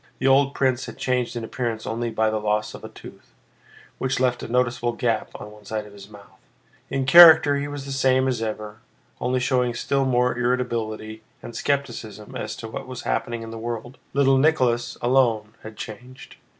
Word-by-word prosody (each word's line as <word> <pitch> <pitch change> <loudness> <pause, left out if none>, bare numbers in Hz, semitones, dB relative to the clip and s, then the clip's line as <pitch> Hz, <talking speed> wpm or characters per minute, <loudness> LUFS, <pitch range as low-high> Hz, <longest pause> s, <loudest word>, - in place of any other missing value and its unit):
The - - -4
old 135 +1 +4
prince 130 -1 0
had - - -9
changed 125 -2 -1
in 120 - -4
appearance 115 -1 -4
only 115 +1 -2
by 110 -1 +1
the 110 - -1
loss 105 0 -1
of - - -11
a - - -7
tooth, - - -14 0.6
which 130 0 -1
left 125 -1 +1
a - - -6
noticeable 120 0 0
gap 115 -2 -1
on 105 - -9
one 105 0 -16
side 105 +1 -4
of 105 - -14
his 100 0 -13
mouth; 105 -1 -16 0.5
in 135 -1 -1
character 160 -1 +9
he 140 +1 -3
was 145 -1 -6
the 140 - -6
same 130 -1 +2
as 125 -4 -1
ever, 110 -1 -5 0.4
only 125 +1 0
showing 125 -1 +1
still 140 +2 0
more 125 -1 +2
irritability 115 -3 -2 0.2
and 120 - -9
skepticism 110 -7 -3
as - - -4
to 115 - -8
what 110 - -7
was 130 -1 -7
happening 120 -2 -2
in 115 - -8
the 115 - -7
world. 120 +2 -6
Little 135 -1 +3
Nicholas 130 -6 +1
alone 120 -4 +2
had 110 -1 -10
changed. 125 +4 -10
120 Hz, 190 wpm, -23 LUFS, 110-130 Hz, 0.6 s, character